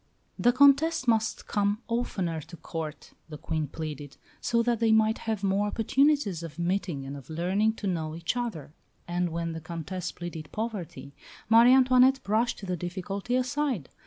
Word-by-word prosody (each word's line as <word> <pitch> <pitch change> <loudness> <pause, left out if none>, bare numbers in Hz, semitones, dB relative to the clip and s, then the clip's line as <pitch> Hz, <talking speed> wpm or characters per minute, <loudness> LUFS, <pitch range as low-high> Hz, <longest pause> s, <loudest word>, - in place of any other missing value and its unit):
The 245 - +5
Comtesse 280 +2 +4
must 220 -2 +1
come 205 +2 0
oftener 190 -9 -2
to 170 - -12
Court, 160 -1 -7 0.2
the 150 - -7
Queen 155 0 -2
pleaded, 145 -2 -7 0.2
so 235 0 +1
that 235 -1 +1
they 225 -1 +3
might 220 0 +3
have 215 -3 -2
more 200 +1 +1
opportunities 255 - +2
of 165 -2 -8
meeting 175 -5 -2
and 135 +1 -6
of 140 0 -11
learning 185 +7 +1
to 220 - -8
know 160 -4 -2
each 165 +7 -2
other; 210 - -4 0.3
and 175 0 -1
when 165 0 -3
the 160 0 -6
Comtesse 170 +3 -5
pleaded 165 -3 -7
poverty, 205 -10 -5 0.4
Marie 230 +2 +7
Antoinette 260 0 +5
brushed 220 0 0
the 180 -1 -2
difficulty 190 +6 -3
aside. 255 - -1
195 Hz, 160 wpm, -28 LUFS, 165-235 Hz, 0.4 s, Marie